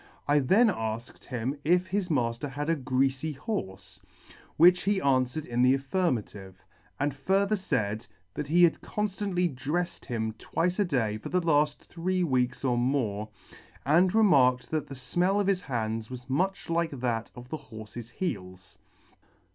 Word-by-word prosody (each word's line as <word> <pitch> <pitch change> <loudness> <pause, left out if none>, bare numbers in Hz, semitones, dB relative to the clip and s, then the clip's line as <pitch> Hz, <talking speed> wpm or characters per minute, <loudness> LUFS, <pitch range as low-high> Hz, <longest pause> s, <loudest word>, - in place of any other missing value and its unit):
I 145 +1 +4
then 200 - +4
alked 115 - -4
him 130 +3 -3
if 180 +3 +3
his 190 0 -2
mafter 120 -2 0
had 145 +4 -2
a - - +2
greafy 135 +2 0
horfe? 95 - -5 0.6
which 180 +3 +7
he 200 -1 +1
anfwered 135 -1 +1
in 120 0 -1
the 130 +1 +5
affirmative; 120 - -3 0.3
and 145 0 0
further 195 +8 +1
faid, 110 - -2 0.3
that 150 - -4
he 175 +4 +4
had 170 - +4
con 210 - -2
ftantly 185 -5 -1
drefled 150 +7 -3
him 110 -2 -2
twice 180 +3 -1
a 205 - +4
day 115 - 0
for - - -7
the 180 - +2
laft 150 -2 +2
three 180 +2 -1
weeks 130 -3 0
or 120 -2 +2
more, 115 -5 0 0.6
and 175 +7 +4
remarked 135 - +4
that 155 -1 -1
the 140 - -8
fmell 175 +10 +1
of 205 - +1
his 190 -1 +1
hands 110 -5 -3
was 125 0 -8
much 185 +9 -1
like 165 0 +1
that 120 -4 -2
of 120 0 -11
the 155 - -3
horfe's 110 +1 -8
heels. 90 - -5
140 Hz, 165 wpm, -28 LUFS, 120-175 Hz, 0.6 s, which